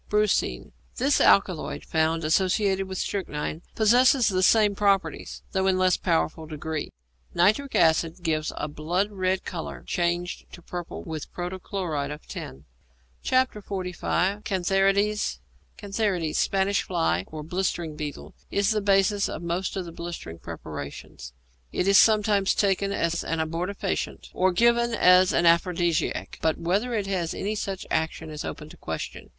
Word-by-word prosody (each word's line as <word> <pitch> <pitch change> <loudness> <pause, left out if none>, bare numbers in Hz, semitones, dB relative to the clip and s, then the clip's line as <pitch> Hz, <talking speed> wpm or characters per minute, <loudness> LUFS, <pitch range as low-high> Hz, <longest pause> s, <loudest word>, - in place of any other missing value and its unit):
=Brucine.= 210 -1 +1 0.2
This 270 +3 +2
alkaloid, 185 -5 +3
found 160 +1 +1
associated 190 +4 +1
with 190 0 -5
strychnine, 160 -5 -3
possesses 245 +3 +5
the 185 -2 0
same 210 +2 +5
properties, 200 -1 0
though 190 -1 +1
in 190 - +3
a - - 0
less 185 -1 +3
powerful 160 -2 -1
degree. 155 0 -4 0.4
Nitric 215 +10 +2
acid 165 +2 +2
gives 155 -2 0
a - - -2
blood 175 +7 -1
red 185 -1 -1
colour, 170 -3 -6
changed 175 0 -2
to 175 - -11
purple 175 -1 -6
with 160 -3 -6
protochloride 175 -4 -3
of 150 +1 -8
tin. 70 +2 -8 0.6
XLV. 200 -5 0
CANTHARIDES 195 +2 +1 0.4
=Cantharides.= 195 -6 -1
Spanish 195 0 +1
fly, 85 +2 0
or 155 -1 -7
blistering 170 -2 -2
beetle, 150 -2 -6 0.2
is 200 +1 +1
the 215 -1 +1
basis 200 0 +2
of 170 - -6
most 175 +2 -2
of 185 - -3
the 170 - -8
blistering 165 - -7
preparations. 70 -6 -8 0.4
It 180 - -1
is 200 0 +7
sometimes 210 -3 +4
taken 200 0 +1
as 170 -3 -1
an 165 - -2
abortifacient 175 +5 -3
or 185 +1 +2
given 235 +4 +3
as 180 -1 +6
an 170 - +2
aphrodisiac, 170 -1 +1
but 160 -1 +1
whether 205 +8 0
it 205 -3 -1
has 185 -4 -2
any 205 +2 -2
such 195 -3 -4
action 160 0 -1
is 150 -1 -5
open - - -6
to - - -14
question. - - -6
185 Hz, 145 wpm, -26 LUFS, 165-200 Hz, 0.6 s, is